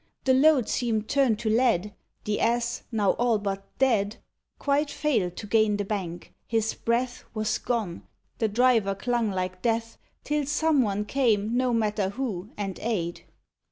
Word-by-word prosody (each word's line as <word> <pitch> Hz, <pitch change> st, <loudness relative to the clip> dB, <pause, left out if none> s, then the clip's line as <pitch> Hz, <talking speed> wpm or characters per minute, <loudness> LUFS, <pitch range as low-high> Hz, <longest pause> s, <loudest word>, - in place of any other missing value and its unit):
The 260 Hz, -, +4 dB
load 265 Hz, -3 st, +5 dB
seemed 225 Hz, -3 st, -1 dB
turned 265 Hz, -6 st, +2 dB
to 225 Hz, -, 0 dB
lead; 220 Hz, -4 st, +2 dB, 0.3 s
The 210 Hz, 0 st, -1 dB
Ass, 235 Hz, 0 st, 0 dB
now 210 Hz, -4 st, +2 dB
all 240 Hz, -2 st, +3 dB
but 195 Hz, -1 st, -3 dB
dead, 220 Hz, -6 st, +2 dB, 0.4 s
Quite 285 Hz, +1 st, +1 dB
failed 220 Hz, -, 0 dB
to -, -, -5 dB
gain 215 Hz, -1 st, +3 dB
the 205 Hz, -, -2 dB
bank: 180 Hz, -4 st, -5 dB
his 225 Hz, -1 st, 0 dB
breath 240 Hz, +2 st, -1 dB
Was 215 Hz, 0 st, 0 dB
gone: 220 Hz, -8 st, -3 dB, 0.3 s
the 225 Hz, -, +2 dB
driver 225 Hz, -3 st, +3 dB
clung 235 Hz, +2 st, 0 dB
like 185 Hz, -1 st, -3 dB
death 230 Hz, -1 st, -1 dB, 0.2 s
Till 295 Hz, -1 st, -1 dB
some 300 Hz, -1 st, +2 dB
one 210 Hz, -2 st, -1 dB
came, 225 Hz, -3 st, +1 dB
no 255 Hz, 0 st, +2 dB
matter 210 Hz, -4 st, +1 dB
who, 210 Hz, -4 st, -4 dB
and 195 Hz, -3 st, -4 dB
aid. 180 Hz, -7 st, -3 dB
225 Hz, 160 wpm, -26 LUFS, 205-245 Hz, 0.4 s, load